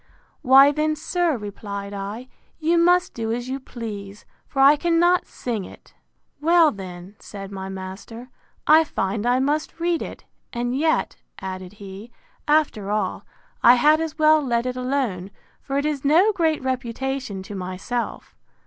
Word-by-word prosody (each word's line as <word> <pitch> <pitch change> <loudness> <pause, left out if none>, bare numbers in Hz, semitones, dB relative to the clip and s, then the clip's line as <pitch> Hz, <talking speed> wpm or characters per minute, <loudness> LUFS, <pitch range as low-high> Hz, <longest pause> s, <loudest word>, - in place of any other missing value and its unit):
Why 270 +2 +7
then, 305 +1 0
sir, 330 -1 0
replied 200 -1 -6
I, 205 +5 -6 0.3
you 335 +2 +2
must 355 +1 +3
do 225 -1 -3
as 240 +2 -3
you 265 +1 -3
please; 210 -6 -8 0.2
for 270 - -5
I 275 +2 +7
cannot 345 +3 +2
sing 230 -5 -4
it. - - -14 0.5
Well, 330 0 +5
then, 185 0 -9
said 195 -1 -9
my 190 -1 -6
master, 195 +6 -8 0.4
I 315 +2 +7
find 205 -5 -2
I 250 +1 +3
must 300 +4 -1
read 340 0 0
it; - - -8 0.3
and 245 +1 -2
yet, 315 +3 0 0.2
added 185 0 -7
he, 200 +2 -10 0.4
after 295 -10 +2
all, 210 +1 -2 0.3
I 245 - +8
had 305 +5 +4
as 320 -1 -4
well 310 0 +5
let 240 -3 0
it 250 0 -2
alone, 250 -8 -2 0.3
for 275 0 -3
it 285 - 0
is 295 -3 -2
no 335 +9 +5
great 320 -6 0
reputation 255 -4 -3
to 205 - -9
myself. 190 +6 -4
255 Hz, 155 wpm, -23 LUFS, 205-305 Hz, 0.5 s, I